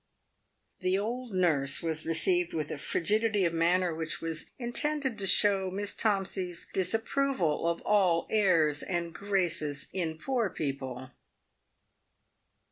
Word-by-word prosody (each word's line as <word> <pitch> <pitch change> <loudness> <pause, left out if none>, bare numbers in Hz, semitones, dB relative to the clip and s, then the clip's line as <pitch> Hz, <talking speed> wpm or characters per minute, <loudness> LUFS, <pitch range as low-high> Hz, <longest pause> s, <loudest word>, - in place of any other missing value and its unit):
The 185 0 +1
old 235 +4 -3
nurse 155 -7 +1
was 160 -1 -2
received 175 +1 +1
with 155 -2 -2
a 145 - -4
frigidity 210 +5 +1
of 170 - 0
manner 175 +1 +2
which 160 0 -2
was 165 -1 -4
intended 265 0 -2
to 195 - +1
show 195 -1 +4
Miss 200 +2 -3
Tomsey's 190 -4 -1
disapproval 195 - 0
of 170 - -2
all 185 -5 +2
airs 165 -9 +3
and 170 -2 -3
graces 170 -8 -1
in 165 -4 -2
poor 235 +4 -1
people. 130 -4 -5
180 Hz, 125 wpm, -29 LUFS, 160-205 Hz, -, show